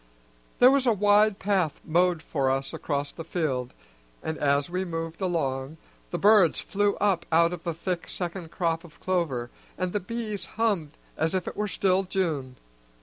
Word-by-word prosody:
There 250 Hz, +1 st, +7 dB
was 270 Hz, -2 st, +2 dB
a 235 Hz, -, +5 dB
wide 205 Hz, 0 st, +4 dB
path 190 Hz, -6 st, 0 dB
mowed 175 Hz, 0 st, +2 dB
for 135 Hz, -4 st, 0 dB
us 135 Hz, +1 st, -1 dB
across 145 Hz, -1 st, -2 dB
the 165 Hz, -, -8 dB
field, 150 Hz, -7 st, -2 dB, 0.5 s
and, 160 Hz, -, -2 dB
as 140 Hz, 0 st, +2 dB
we 180 Hz, +2 st, -2 dB
moved 165 Hz, 0 st, -5 dB
along, 145 Hz, -5 st, -1 dB, 0.3 s
the -, -, -2 dB
birds 205 Hz, -5 st, +5 dB
flew 205 Hz, 0 st, 0 dB
up 190 Hz, -4 st, +1 dB
out 170 Hz, +1 st, +4 dB
of 175 Hz, -, -7 dB
the 170 Hz, -2 st, -3 dB
thick 175 Hz, +1 st, -3 dB
second 175 Hz, -1 st, -5 dB
crop 165 Hz, -1 st, -1 dB
of 165 Hz, -3 st, -16 dB
clover, 155 Hz, -10 st, -1 dB, 0.3 s
and 185 Hz, -1 st, -2 dB
the 205 Hz, -, +1 dB
bees 215 Hz, -1 st, -4 dB
hummed 200 Hz, -10 st, 0 dB, 0.2 s
as 160 Hz, +3 st, 0 dB
if 185 Hz, -, -1 dB
it -, -, -3 dB, 0.2 s
still 190 Hz, -1 st, +2 dB
were -, -, -8 dB
June. 155 Hz, -9 st, -1 dB
175 Hz, 175 wpm, -27 LUFS, 155-195 Hz, 0.5 s, There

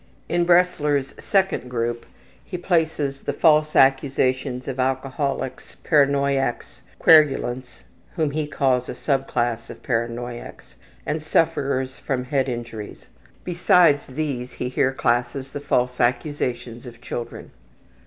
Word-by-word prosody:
In 175 Hz, 0 st, +1 dB
Bresler's 150 Hz, -6 st, +2 dB
second 190 Hz, -, +1 dB
group 120 Hz, -1 st, -3 dB, 0.4 s
he 180 Hz, -, -6 dB
places 160 Hz, -6 st, 0 dB
the 145 Hz, -, -3 dB
false 155 Hz, 0 st, +3 dB
accusations 135 Hz, -1 st, +2 dB
of 135 Hz, -1 st, -4 dB
alcoholics, 130 Hz, +1 st, -2 dB
paranoiacs, 140 Hz, -4 st, +1 dB, 0.2 s
querulants 130 Hz, -, +3 dB, 0.3 s
(whom 155 Hz, -3 st, 0 dB
he 150 Hz, 0 st, -2 dB
calls 130 Hz, -3 st, 0 dB
a -, -, -5 dB
sub 135 Hz, -2 st, -1 dB
class 120 Hz, -1 st, -1 dB
of -, -, -11 dB
paranoiacs) 120 Hz, 0 st, -4 dB, 0.3 s
and 155 Hz, -, -2 dB
sufferers 140 Hz, -5 st, 0 dB
from 130 Hz, -3 st, -2 dB
head 135 Hz, +1 st, 0 dB
injuries. 115 Hz, -3 st, -7 dB, 0.4 s
Besides 175 Hz, -4 st, +3 dB
these, 130 Hz, -3 st, -4 dB
he 125 Hz, -, -4 dB
here 130 Hz, +1 st, +1 dB
classes 125 Hz, +1 st, -1 dB
the -, -, -5 dB
false 125 Hz, -3 st, 0 dB
accusations 125 Hz, -2 st, -2 dB
of 120 Hz, -1 st, -11 dB
children. 120 Hz, -1 st, -7 dB
135 Hz, 120 wpm, -23 LUFS, 125-150 Hz, 0.4 s, false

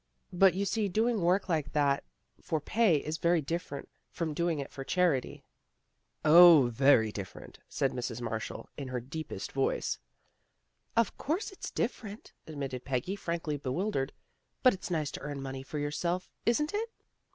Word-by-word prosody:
" -, -, -45 dB
But 180 Hz, 0 st, +5 dB
you 200 Hz, +1 st, 0 dB
see 205 Hz, +1 st, 0 dB
doing 220 Hz, +2 st, +1 dB
work 180 Hz, +4 st, +2 dB
like 160 Hz, -5 st, -1 dB
that 140 Hz, -2 st, +2 dB, 0.4 s
for 160 Hz, -, -1 dB
pay 210 Hz, +3 st, +3 dB
is 155 Hz, +2 st, -4 dB
very 170 Hz, 0 st, +3 dB
different 155 Hz, -1 st, -4 dB, 0.2 s
from 165 Hz, -3 st, -3 dB
doing 170 Hz, +1 st, 0 dB
it 140 Hz, -1 st, -5 dB
for 135 Hz, -, -6 dB
charity." 170 Hz, -5 st, 0 dB, 0.4 s
" -, -, -23 dB
O, 170 Hz, -7 st, +9 dB
very 115 Hz, -3 st, +5 dB
different," 100 Hz, -3 st, -8 dB
said 135 Hz, -, 0 dB
Mrs. 120 Hz, -2 st, -4 dB
Marshall 115 Hz, -2 st, -4 dB
hi 140 Hz, -, -4 dB
her 130 Hz, -1 st, -3 dB
deepest 135 Hz, -3 st, -6 dB
voice. 135 Hz, 0 st, 0 dB, 0.5 s
" -, -, -27 dB
Of 230 Hz, -2 st, +2 dB
course 345 Hz, +10 st, -1 dB
it's 385 Hz, -, -7 dB
different," 220 Hz, -3 st, -4 dB
admitted 135 Hz, -5 st, -5 dB
Peggy, 135 Hz, +8 st, -2 dB
frankly 170 Hz, -5 st, -3 dB
bewildered. 140 Hz, +1 st, -1 dB, 0.3 s
" -, -, -47 dB
But 255 Hz, -, +7 dB
it's 190 Hz, +1 st, -7 dB
nice 155 Hz, -5 st, -1 dB
to -, -, -6 dB
earn 145 Hz, -1 st, -5 dB
money 135 Hz, -1 st, -5 dB
for 135 Hz, +3 st, -6 dB
yourself, 170 Hz, +5 st, -2 dB, 0.2 s
isn't 300 Hz, -, +2 dB
it? 445 Hz, +3 st, -1 dB
155 Hz, 170 wpm, -30 LUFS, 135-185 Hz, 0.5 s, O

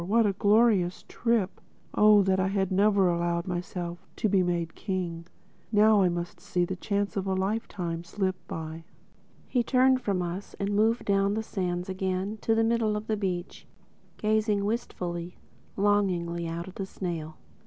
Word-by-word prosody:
What 220 Hz, +5 st, +3 dB
a 200 Hz, -, +2 dB
glorious 205 Hz, -3 st, +3 dB
trip!—Oh 210 Hz, -1 st, +2 dB
that 190 Hz, 0 st, +2 dB
I 190 Hz, -, +2 dB
had 195 Hz, -1 st, 0 dB
never 200 Hz, 0 st, +4 dB
allowed 170 Hz, 0 st, 0 dB
myself 175 Hz, 0 st, -5 dB
to -, -, 0 dB
be 195 Hz, -2 st, +3 dB
made 170 Hz, -2 st, -1 dB
king! 175 Hz, -4 st, -4 dB, 0.4 s
Now 215 Hz, -1 st, +5 dB
I 185 Hz, -, +4 dB
must 175 Hz, 0 st, -4 dB
see 180 Hz, -1 st, 0 dB
the 185 Hz, -, -4 dB
chance 200 Hz, +2 st, -2 dB
of 195 Hz, -1 st, -2 dB
a 190 Hz, -, +1 dB
lifetime 190 Hz, -4 st, -2 dB
slip 185 Hz, +2 st, -1 dB
by." 160 Hz, 0 st, -6 dB, 0.6 s
He 250 Hz, -, +1 dB
turned 255 Hz, +1 st, +3 dB
from 195 Hz, -5 st, 0 dB
us 175 Hz, +3 st, -5 dB
and 200 Hz, +1 st, -1 dB
moved 225 Hz, +3 st, +2 dB
down 200 Hz, 0 st, +2 dB
the 220 Hz, -, -1 dB
sands 180 Hz, -3 st, -3 dB
again 190 Hz, +2 st, -2 dB
to 225 Hz, -, +2 dB
the 225 Hz, -, +3 dB
middle 225 Hz, -2 st, +1 dB
beach, 200 Hz, -5 st, -3 dB, 0.5 s
gazing 215 Hz, -1 st, +1 dB
wistfully, 180 Hz, -6 st, -3 dB, 0.4 s
longingly 180 Hz, -4 st, +1 dB
out 170 Hz, +2 st, -4 dB
at 190 Hz, -, -11 dB
the 195 Hz, -, -3 dB
snail. 165 Hz, -5 st, -5 dB
190 Hz, 155 wpm, -28 LUFS, 175-210 Hz, 0.6 s, Now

